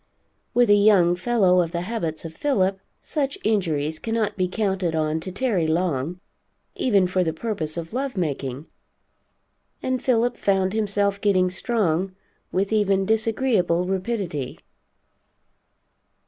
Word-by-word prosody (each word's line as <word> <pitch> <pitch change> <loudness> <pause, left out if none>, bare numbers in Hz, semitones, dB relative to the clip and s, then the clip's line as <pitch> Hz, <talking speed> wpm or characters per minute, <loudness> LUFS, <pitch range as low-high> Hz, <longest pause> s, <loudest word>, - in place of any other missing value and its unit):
With 240 -3 +4
a - - +8
young 200 -4 +5
fellow 185 -2 +3
of 165 -1 -2
the 170 - -1
habits 175 -6 -3
of 160 - -6
Philip, 195 - 0 0.2
such 280 -2 -2
injuries 160 -8 0
cannot 225 -2 -1
be 185 -2 0
counted 190 -4 -1
on 155 0 0
to 185 +4 -6
tarry 200 -6 0
long, 165 -1 -1 0.5
even 200 -7 +2
for 185 0 +1
the 160 - 0
purpose 160 -5 -3
of 165 +3 -6
love 260 -2 -3
making, 140 -4 -3 1.2
and 260 -1 -1
Philip 240 -1 +1
found 190 -1 +1
himself 200 -2 0
getting 185 -3 +2
strong 190 -3 0 0.4
with 195 +3 0
even 195 -2 +2
disagreeable 220 -5 +1
rapidity. 185 - -3
190 Hz, 130 wpm, -23 LUFS, 170-220 Hz, 1.2 s, a